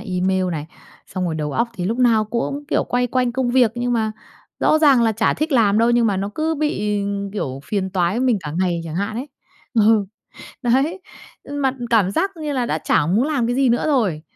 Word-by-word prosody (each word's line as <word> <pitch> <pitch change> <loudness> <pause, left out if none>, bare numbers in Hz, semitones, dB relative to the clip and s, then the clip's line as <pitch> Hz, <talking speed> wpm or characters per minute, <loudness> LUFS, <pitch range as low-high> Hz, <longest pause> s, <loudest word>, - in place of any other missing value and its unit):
email 185 0 0
này. 155 -2 -4 0.4
Xong 185 -1 -4
rồi, 170 -3 -2
đầu 150 -2 -3
óc 235 +1 0
thì 180 - -4
lúc 225 +6 -1
nào 230 -3 +4
cũng, 240 +6 -3
kiểu, - - +1
quay 245 0 0
quanh 250 0 0
công 255 -1 0
việc 245 -3 +4
nhưng 245 0 -1
mà 220 -2 0 0.5
rõ 310 - +4
ràng 280 -6 +5
là 225 -1 +2
chả 220 +1 +1
thích 310 +1 -2
làm 220 -5 +3
đâu, 230 +1 +3
nhưng 240 -1 +3
mà 200 - +1
nó 195 +2 -3
cứ 320 +1 0
bị, 210 -9 -1 0.3
kiểu, 135 -10 -4
phiền 190 +3 -2
toái 180 -1 0
với 235 - -1
mình 235 -5 +2
cả 150 -3 -6
ngày 180 -2 0
chẳng 160 -1 -6
hạn 200 +5 -2
ấy. 265 +5 -5 0.5
Ừ, 220 -1 +4 0.6
đấy. 275 +9 +1 0.4
Nhưng 285 0 -5
mà 265 -1 +2 0.2
cảm 210 -5 +3
giác 390 - 0
như 305 -2 -3
là 255 -3 0
đã 155 - -1
chả 150 - +1
muốn 210 +9 +2
làm 275 -7 0
cái 245 - 0
gì 265 -1 +3
nữa 235 - +1
rồi, 220 - +1
230 Hz, 230 wpm, -20 LUFS, 190-255 Hz, 0.6 s, ràng